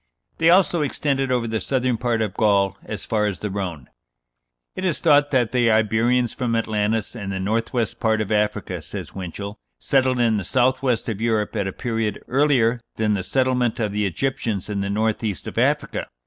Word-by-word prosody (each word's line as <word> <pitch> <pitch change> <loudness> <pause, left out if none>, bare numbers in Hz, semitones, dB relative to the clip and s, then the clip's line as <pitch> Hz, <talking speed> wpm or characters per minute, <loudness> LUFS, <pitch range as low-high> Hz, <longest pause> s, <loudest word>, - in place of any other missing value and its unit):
They 165 0 +5
also 175 -2 +4
extended 135 -2 -1
over 125 -2 +1
the 110 0 -1
southern 130 0 0
part 115 -1 0
of 105 -4 -3
Gaul 100 -3 +2
as 110 - -6
far 105 -1 +1
as 100 -3 -3
the 105 - -4
Rhone. 90 -9 -4 0.9
"It 185 - -5
is 185 -4 +1
thought 145 -3 +4
that 125 -5 +1
the 120 -2 +3
Iberians 110 +3 +2
from 120 -2 -1
Atlantis 110 0 -1
and 100 -4 -5
the 95 - -3
north 110 +4 -1
west 115 -5 -2
part 110 -1 +2
of 110 -1 -2
Africa," 105 -4 0
says 85 +1 -7
Winchell, 100 +2 -6 0.2
"settled 130 -2 +2
in 115 -3 +2
the 100 - -2
south 130 +7 +2
west 125 -4 0
of 110 -2 -3
Europe 110 -2 0
at 100 -3 0
a - - -2
period 115 -1 -2
earlier 125 -4 +2
than 110 -1 +1
the 100 - 0
settlement 125 0 0
of 105 -3 0
the 105 0 0
Egyptians 110 -1 -2
in 100 -1 -2
the 100 - -2
north 110 +2 0
east 100 -9 -3
of - - -3
Africa. - - 0
110 Hz, 200 wpm, -22 LUFS, 105-125 Hz, 0.9 s, They